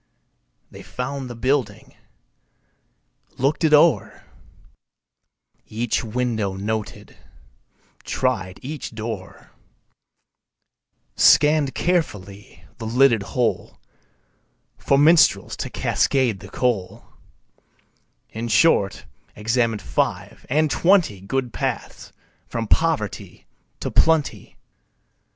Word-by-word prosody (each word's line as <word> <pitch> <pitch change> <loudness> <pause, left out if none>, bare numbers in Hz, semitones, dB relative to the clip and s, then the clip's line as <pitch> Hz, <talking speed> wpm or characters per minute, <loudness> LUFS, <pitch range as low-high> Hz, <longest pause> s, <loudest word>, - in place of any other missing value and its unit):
They - - -11
found 130 +1 -5
the 120 - -7
building, 130 +3 -2 1.4
looked 140 +6 0
it 160 - +3
o'er, 150 +2 +3 1.4
Each 115 +3 -2
window 110 -3 -2
noted, 105 +2 -5 0.9
tried 95 -8 -2
each 140 -4 -7
door, 110 -4 -7 1.6
Scanned 150 -2 +4
carefully 105 - -3
the 110 - -5
lidded 120 -1 +3 0.2
hole 120 -2 -1 1.0
For 140 - +1
minstrels 155 +2 +4
to - - -4
cascade 125 -7 0
the - - -12
coal 115 -8 -2 1.3
In 115 +1 -5
short, 115 -4 +2 0.3
examined 115 0 -1
five - - -3
and 150 +2 +1
twenty 170 - +2
Good 125 +4 -3
paths - - -4 0.4
from 115 0 -4
poverty 160 - -1 0.4
to - - -3
plenty. 160 -2 +1
125 Hz, 85 wpm, -22 LUFS, 110-145 Hz, 1.6 s, Scanned